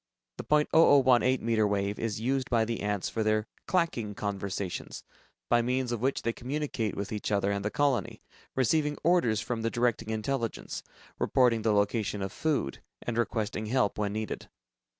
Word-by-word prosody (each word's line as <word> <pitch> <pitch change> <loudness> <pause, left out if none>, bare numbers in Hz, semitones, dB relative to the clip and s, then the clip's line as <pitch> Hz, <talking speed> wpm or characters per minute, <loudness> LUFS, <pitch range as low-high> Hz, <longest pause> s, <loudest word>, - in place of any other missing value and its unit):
The - - -5
.0018 140 -4 +4
meter 110 -2 +2
wave 100 0 -1
is 110 -2 -2
used 130 +3 -1
by 115 -2 +3
the 115 0 -3
ants 105 -2 -1
for 115 - -2
their 110 0 +2 0.2
"clacking" 165 - 0
conversations, 100 -2 -4 0.4
by 120 - +4
means 125 +1 0
of 120 -2 -2
which 135 +2 0
they 115 - 0
communicate 130 -5 -3
with 100 +1 -4
each 105 -1 -3
other 100 -1 +2
and 100 0 -2
the 105 - 0
colony, 140 +1 0 0.3
receiving 150 +3 +2
orders 145 -12 +3
from 115 +1 -3
the 115 - 0
directing 120 -2 0
intelligence, 115 +2 -3 0.4
reporting 120 -3 +3
the 110 - +2
location 105 0 +1
of 95 - -3
food, 145 - -1 0.2
and 120 - -3
requesting 110 -2 -1
help, 115 -3 +1
when 105 -1 0
needed. 110 0 -4
115 Hz, 165 wpm, -29 LUFS, 105-130 Hz, 0.4 s, 0018